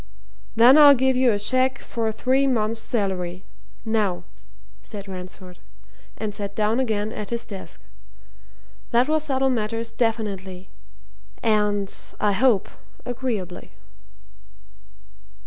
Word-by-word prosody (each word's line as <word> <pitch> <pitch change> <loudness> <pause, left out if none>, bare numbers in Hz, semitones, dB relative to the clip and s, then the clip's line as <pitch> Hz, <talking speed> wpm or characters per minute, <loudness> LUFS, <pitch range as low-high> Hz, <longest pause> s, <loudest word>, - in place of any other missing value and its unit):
"Then 245 +6 +7
I'll 290 -1 +9
give 260 0 +2
you 255 -1 +4
a 205 - +1
cheque 255 +5 +2
for 225 -2 -3
three 260 +5 +1
months' 225 -3 0
salary 185 -5 -2 0.4
now," 210 -5 0 0.6
said 200 - -9
Ransford, 185 -1 -9 0.6
and 215 -1 -4
sat 200 -1 -6
down 215 +3 +1
again 220 -4 -1
at 210 -2 -6
his 235 0 -3
desk. 190 -5 -9 1.1
"That 240 +2 +3
will 310 +1 +2
settle 270 -3 0
matters 230 0 -2
definitely 195 -5 -3 0.7
and, 210 -3 +1 0.3
I 210 - +2
hope, 220 -1 +3 0.4
agreeably." 225 - -4
220 Hz, 115 wpm, -23 LUFS, 200-250 Hz, 1.1 s, I'll